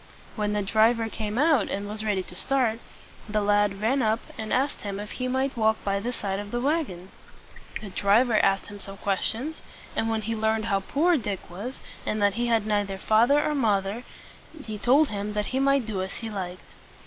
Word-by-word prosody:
When 210 -1 -1
the 210 -1 0
driver 225 +3 +3
came 215 0 -4
out 290 -6 +3
and 200 +1 -3
was 210 +1 -5
ready 205 -3 0
to 180 - -12
start, 240 0 +1 0.5
the 215 0 +1
lad 205 -1 +2
ran 260 +5 +2
up 220 0 +2 0.2
and 220 -1 -5
asked 275 +3 +1
him 200 -1 -4
if 210 0 -6
he 255 - -3
might 260 +1 0
walk 220 -1 +3
by 200 0 0
the 235 +5 -2
side 195 -5 -3
of 205 0 -6
the 240 - -2
wagon. 255 - -1 0.7
The 210 - -7
driver 215 +4 +3
asked 195 0 +2
him 205 0 -10
some 195 0 -7
questions; 225 +10 -2 0.3
and 225 - +1
when 220 -1 -1
he 225 +2 -2
learned 220 0 +1
how 200 -3 +2
poor 315 - +2
Dick 205 -7 -4
was, 215 +9 -6 0.3
and 215 - -1
that 205 -1 +3
he 240 +2 -1
had 225 -3 +2
neither 205 -2 0
father 230 +8 +4
nor 300 - 0
mother, 210 -4 +1 0.6
he 215 -2 -5
told 280 +7 +4
him 205 0 -3
that 210 0 0
he 260 - +2
might 275 -2 +3
do 205 -4 -2
as 190 +1 -4
he 225 -2 -5
liked. 185 -3 -6
215 Hz, 205 wpm, -26 LUFS, 200-240 Hz, 0.7 s, father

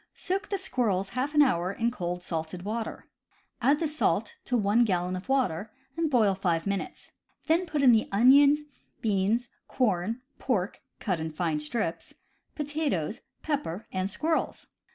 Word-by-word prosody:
Soak 390 +2 -3
the 400 - 0
squirrels 220 - 0
half 270 +4 -2
an 295 - +8
hour 180 -8 +1
in 230 +4 0
cold 180 -5 -4
salted 165 +1 -4
water. 220 +2 -4 0.5
Add 275 +5 +4
the 320 - 0
salt 225 - 0
to 250 - +1
one 210 +2 +3
gallon 180 -4 0
of 185 +7 -7
water, 220 -7 0 0.2
and 330 -1 0
boil 225 -7 +4
five 175 -4 0
minutes. 200 -1 -4 0.3
Then 340 +3 +2
put 300 -3 -1
in 255 - +8
the 225 -2 +3
onion, 275 +7 +6 0.4
beans, 215 +3 +1 0.2
corn, 225 0 0 0.2
pork 205 -7 -1 0.2
(cut 185 -6 -1
in 160 0 -3
fine 160 -1 -1
strips), 165 +3 -3 0.4
potatoes, 290 - -2 0.2
pepper, 270 - -2
and 185 0 -1
squirrels. 315 +10 -1
220 Hz, 155 wpm, -28 LUFS, 185-275 Hz, 0.5 s, an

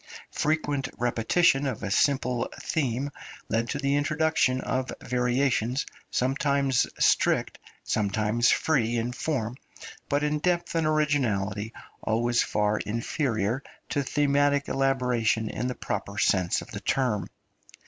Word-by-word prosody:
Frequent 145 -3 0
repetition 130 +5 +2
of 120 -5 -4
a 100 - -3
simple 125 -1 +1
theme 135 -2 -1 0.4
led 115 +1 0
to - - -1
the 140 0 +1
introduction 150 -3 +2
of 130 0 -2
variations, 125 0 0 0.2
sometimes 135 0 +1
strict, - - +2 0.2
sometimes 110 +3 +1
free 120 -7 +2
in 115 +1 -1
form, 125 -2 -2 0.5
but 145 +1 +1
in 150 0 0
depth 175 +1 0
and 165 -2 +1
originality 115 -9 0 0.3
always 120 +2 +1
far 105 0 +1
inferior 115 0 -1 0.3
to 145 - 0
thematic 145 +1 +2
elaboration 125 -5 +1
in 125 - -2
the 125 - -3
proper - - -4
sense 90 -2 +2
of - - -15
the - - -5
term. 125 -7 0
130 Hz, 120 wpm, -27 LUFS, 115-145 Hz, 0.5 s, repetition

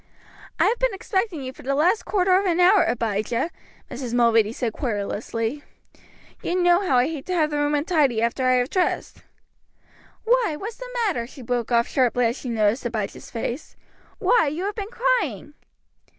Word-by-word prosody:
"I - - +4
have 475 - +1
been - - +1
expecting 380 -6 -2
you 260 0 -6
for - - -14
the 275 +2 -1
last 350 +9 +2
quarter 370 -2 +2
of 390 +1 +2
an 345 -1 +1
hour, 370 +2 +6
Abijah," 230 +5 -1 0.4
Mrs. 245 -2 -4
Mulready 230 -3 +4
said 235 -2 -3
querulously. 230 +3 -3 0.8
"You 350 - -2
know 350 0 +4
how 320 -10 +2
I 245 - +4
hate 300 -2 -5
to 365 - -1
have 310 -3 +2
the 295 - -1
room 290 0 +1
untidy 290 -6 +2
after 235 +3 0
I 255 - +4
have 250 +1 +1
dressed. 370 -2 -1 1.0
"Why, 460 -8 +2
what's 435 +3 -6
the - - -8 0.2
matter?". 245 - -1
she 265 0 -12
broke 240 0 -2
off 235 0 +3
sharply 250 -2 +2
as 230 +1 +1
she 260 - -7
noticed 220 +1 +1
Abijah's 225 -4 -4
face. 235 +4 -5 0.4
"Why, 470 -11 +3
you 305 +6 -3
have 410 - -2
been 410 -1 -5
crying!" 455 - -1
280 Hz, 180 wpm, -23 LUFS, 235-365 Hz, 1.0 s, hour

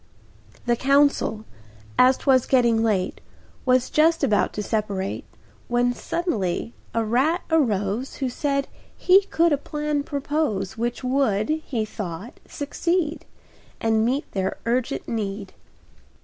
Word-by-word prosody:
The 240 -1 +3
council, 275 -5 +2 0.5
as 255 +1 +5
'twas 260 -3 +3
getting 235 -4 +3
late, 200 -5 0 0.5
Was 255 0 +3
just 325 +1 +3
about 205 -8 +2
to 210 - -3
separate, 205 -3 -2 0.4
When 245 0 +2
suddenly 230 - -2 0.2
a 230 -1 0
rat 270 - +1
arose 225 -5 +1
Who 270 - -2
said 275 +2 -1 0.3
he 375 +2 +6
could 335 -4 +2
a 285 - +1
plan 300 0 -2
propose 280 -9 -2
Which 240 +3 -3
would, 250 -6 +1
he 300 -8 -1
thought, 205 +1 -7
succeed 330 +2 -2 0.5
And 220 -1 +2
meet 260 +6 0
their 190 -1 -2
urgent 250 +3 -1
need. 200 -3 -4
245 Hz, 120 wpm, -24 LUFS, 215-285 Hz, 0.5 s, he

